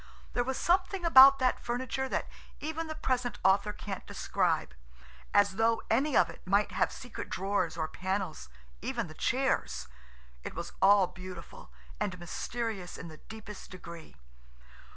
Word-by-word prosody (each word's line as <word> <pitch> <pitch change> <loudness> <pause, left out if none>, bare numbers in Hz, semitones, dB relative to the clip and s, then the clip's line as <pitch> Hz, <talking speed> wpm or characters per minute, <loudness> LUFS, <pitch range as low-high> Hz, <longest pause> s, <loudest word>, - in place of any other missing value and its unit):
There 245 - +1
was 265 +1 -2
something 370 +1 +1
about 275 -3 +10
that 255 -2 +1
furniture 260 +2 -2
that - - -1 0.3
even 320 +2 -3
the 315 - -5
present 250 -4 -1
author 195 +2 +4
can't 200 -2 -6
describe–as 65 - -1
though 225 0 +2
any 270 +5 +3
of - - +5
it - - -11
might 200 +3 +2
have - - +1
secret 245 -3 -8
drawers 195 -2 -1
or 160 -1 -1
panels–even 70 - -4
the - - -10
chairs. - - 0 0.6
It - - -6
was 170 +1 -6
all 195 0 +7
beautiful, 180 - -10 0.3
and 185 - -2
mysterious 195 +2 -4
in 170 - -8
the 155 - -11
deepest 215 0 -10
degree. 170 -3 -10
205 Hz, 140 wpm, -31 LUFS, 175-255 Hz, 0.6 s, about